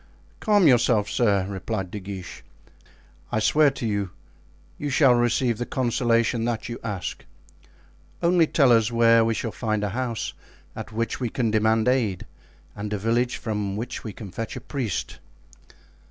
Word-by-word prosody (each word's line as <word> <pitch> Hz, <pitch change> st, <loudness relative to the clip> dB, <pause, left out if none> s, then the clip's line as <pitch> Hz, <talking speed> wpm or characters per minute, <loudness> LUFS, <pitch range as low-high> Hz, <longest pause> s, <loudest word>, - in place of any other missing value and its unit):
"Calm 205 Hz, -3 st, +3 dB
yourself, 120 Hz, -5 st, +4 dB
sir," 100 Hz, -5 st, +2 dB
replied 95 Hz, -1 st, -4 dB
De 105 Hz, -, -5 dB
Guiche. 95 Hz, -2 st, -8 dB, 0.9 s
"I -, -, 0 dB
swear 150 Hz, +7 st, +4 dB
to 135 Hz, -3 st, -6 dB
you, 100 Hz, -3 st, -1 dB, 0.7 s
you 145 Hz, -, -2 dB
shall 135 Hz, -2 st, +5 dB
receive 120 Hz, -1 st, +1 dB
the 120 Hz, -, -2 dB
consolation 120 Hz, -2 st, +1 dB
that 120 Hz, -2 st, -2 dB
you 120 Hz, 0 st, -6 dB
ask. 105 Hz, -5 st, -4 dB, 1.0 s
Only 170 Hz, -1 st, +4 dB
tell 140 Hz, -5 st, +4 dB
us 115 Hz, 0 st, +4 dB
where 115 Hz, -1 st, +5 dB
we 115 Hz, 0 st, +1 dB
shall 115 Hz, -, -3 dB
find 110 Hz, -2 st, -2 dB
a 105 Hz, -, 0 dB
house 120 Hz, +1 st, -3 dB, 0.4 s
at -, -, -7 dB
which 115 Hz, +1 st, -2 dB
we 125 Hz, -3 st, -1 dB
can 115 Hz, -1 st, -1 dB
demand 110 Hz, +1 st, +2 dB
aid 120 Hz, -8 st, +1 dB, 0.5 s
and 105 Hz, 0 st, -5 dB
a 105 Hz, -, 0 dB
village 115 Hz, +4 st, 0 dB
from 105 Hz, -3 st, -3 dB
which 120 Hz, +3 st, -5 dB
we 110 Hz, -, -5 dB
can 100 Hz, -1 st, -9 dB
fetch 115 Hz, +4 st, -5 dB
a -, -, -6 dB
priest." 125 Hz, -, -4 dB
115 Hz, 160 wpm, -24 LUFS, 105-125 Hz, 1.0 s, shall